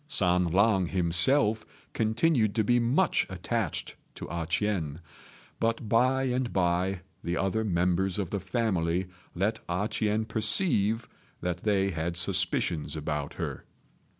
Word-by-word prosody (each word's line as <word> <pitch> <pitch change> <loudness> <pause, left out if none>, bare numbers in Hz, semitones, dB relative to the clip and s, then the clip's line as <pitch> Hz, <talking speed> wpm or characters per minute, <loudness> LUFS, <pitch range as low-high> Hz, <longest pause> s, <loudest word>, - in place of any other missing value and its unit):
San 90 - +2
lang 95 +2 +3
himself 100 - +3 0.3
continued 110 -1 +1
to 110 - +2
be 120 +3 +3
much 120 +3 +2
attached - - -3 0.2
to - - -7
A 85 -1 -3
ch'ien; 85 -5 -1 0.6
but 115 0 -1
by 130 +4 +3
and 125 -1 -1
by 90 +1 0 0.2
the 85 0 -2
other 95 +3 0
members 90 -1 +1
of 100 -5 -3
the 100 - -1
family 95 -4 0 0.3
let 105 +5 0
A 90 +4 0
ch'ien 110 0 0
perceive 110 - +1 0.3
that 90 0 -2
they 100 0 +1
had 85 +1 -3
suspicions 90 -3 0
about 75 -2 -3
her. - - -5
100 Hz, 130 wpm, -28 LUFS, 85-110 Hz, 0.6 s, lang